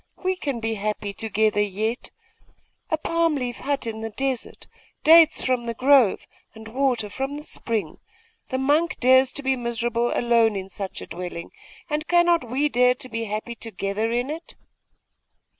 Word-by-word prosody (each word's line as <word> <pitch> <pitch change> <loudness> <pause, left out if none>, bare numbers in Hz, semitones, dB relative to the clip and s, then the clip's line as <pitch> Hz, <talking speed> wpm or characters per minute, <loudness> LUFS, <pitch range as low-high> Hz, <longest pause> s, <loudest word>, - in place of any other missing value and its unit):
We 370 0 +1
can 280 -9 -3
be 225 0 -2
happy 210 -1 -3
together 215 0 +1
yet. 215 +4 -2 0.8
A 315 - +1
palm 330 0 +1
leaf 250 -3 -3
hut 280 -2 -2
in 220 -1 -5
the 225 - -4
desert, 265 +2 -4 0.4
dates 325 0 +7
from 250 -2 0
the 230 - -3
grove, 260 -4 +4 0.3
and 220 0 -11
water 250 -3 0
from 270 +7 -4
the 300 - -8
spring 215 - -3 0.5
the 260 - -1
monk 295 +5 +1
dares 260 +1 +5
be 270 -2 0
miserable 235 -1 -1
alone 230 -2 +3
in 190 -1 -5
such 195 -1 -6
a - - -8
dwelling, 175 -2 -7 0.4
and 305 -1 -2
cannot 345 -7 +3
we 275 +5 +1
dare 250 -2 +3
to 255 -1 -7
be 230 -1 -3
happy 215 +3 -4
together 215 -1 -3
in 245 +4 -1
it? 330 +2 -8
240 Hz, 160 wpm, -24 LUFS, 220-280 Hz, 0.8 s, dates